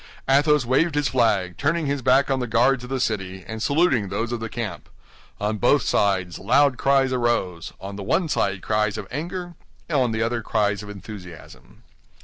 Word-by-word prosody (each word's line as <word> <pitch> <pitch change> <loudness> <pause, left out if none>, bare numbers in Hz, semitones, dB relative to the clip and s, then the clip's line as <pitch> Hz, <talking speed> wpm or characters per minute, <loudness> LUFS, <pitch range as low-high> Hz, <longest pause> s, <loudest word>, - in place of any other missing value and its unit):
Athos 145 0 +4
waved 145 +6 +2
his 145 -2 +1
flag, 105 -8 +1
turning 160 +2 0
his 140 -1 -1
back 130 +2 +3
on 135 - +1
the 125 - -2
guards 125 +3 +2
of 125 - -8
the 135 0 -2
city, 95 -6 -2
and 110 0 -6
saluting 140 - +2
those 115 +5 -2
of 120 - -2
the 115 0 -5
camp. 110 -6 -5 0.5
On 105 +1 -2
both 125 +3 +3
sides 95 -5 0
loud 130 +6 +3
cries 135 -1 +3
arose—on 100 -5 -2
the - - -6
one 165 - +1
side 100 -10 -1
cries 105 -1 0
of - - -6
anger, 175 +5 -5 0.4
on 130 -6 +2
the 110 0 0
other 115 +1 -1
cries 105 -2 0
of 105 - -10
enthusiasm. 90 - -11
120 Hz, 180 wpm, -23 LUFS, 105-135 Hz, 0.5 s, Athos